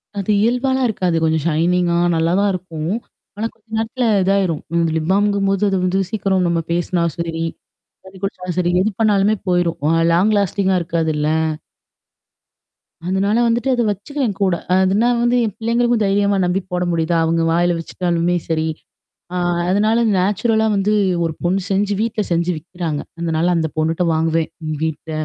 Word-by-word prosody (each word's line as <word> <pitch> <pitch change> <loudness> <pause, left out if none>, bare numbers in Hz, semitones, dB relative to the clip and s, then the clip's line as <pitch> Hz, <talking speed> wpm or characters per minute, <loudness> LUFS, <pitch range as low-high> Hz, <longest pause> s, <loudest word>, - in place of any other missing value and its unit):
அது 200 +1 -1
இயல்பாலாம் 255 +3 +1
இருக்காது. 180 -5 -1
கொஞ்சம் 160 -2 +1
ஷைனிங்கா, 170 +2 +1 0.2
நல்லாதான் 180 +5 +2
இருக்கும். 165 -3 -5 0.5
ஆனா 220 +2 -1
கொஞ்ச - - -36
நேரத்தில 225 +3 -1 0.2
இதாயிரும். 190 -5 +1 0.3
லிப் 160 +1 -2
பாமுங்கும் 200 0 +2
போது 195 +1 0
அது 195 - 0
வந்து 185 +1 +1
சீக்கிரம் 195 -4 0
நம்ம 170 -1 +1
பேசினாலும் 170 -1 0
சரி, 165 -1 -2 0.6
தண்ணி 190 0 -13
குடிச்சாலும் 180 -3 -4
சரி, 175 -1 +1
எது 215 - 0
பண்ணாலுமே 210 -1 +3
போயிரும். 175 -2 +1 0.3
லாங் 195 +5 +3
லாஸ்டிங்கா 190 -1 +1
இருக்காதுல்ல? 160 -3 -1 1.8
அதனால 195 +4 +1
வந்துட்டு 235 +3 0
அதை 245 -1 +1
வச்சுக்குவேன் 215 +1 -3
கூட. 190 -3 +2 0.2
அதுனா 190 +5 +3
வந்து 240 +1 +2
என் 210 - -3
பிள்ளைங்களுக்கும் 235 0 +1
தைரியமா 200 0 +2
நம்பி 180 +2 0
போட 180 0 0
முடியுதா, 165 0 0
அவங்க 165 +1 +1
வாயில 175 +1 +2
வச்சுகிட்டாலுமே 175 +1 -1
சரி. 160 -1 0 0.7
அ - - -2 0.3
அதனால 215 +4 +2
நேச்சுரலா 220 +4 +1
வந்து 200 +2 +1 0.3
ஒரு 165 - -1
பொண்ணு 185 +3 +1
செஞ்சு, 205 +1 +1
வீட்டில 225 -1 -1
செஞ்சு 170 +1 +1
விக்கிறாங்க. 165 -2 -4 0.2
அதனால 165 0 0
அந்த 160 -1 0
பொண்ணுட்ட 160 +3 0
வாங்குவேன் 160 0 0 0.3
வீட்டில. 160 0 -4
185 Hz, 145 wpm, -19 LUFS, 170-205 Hz, 1.8 s, பண்ணாலுமே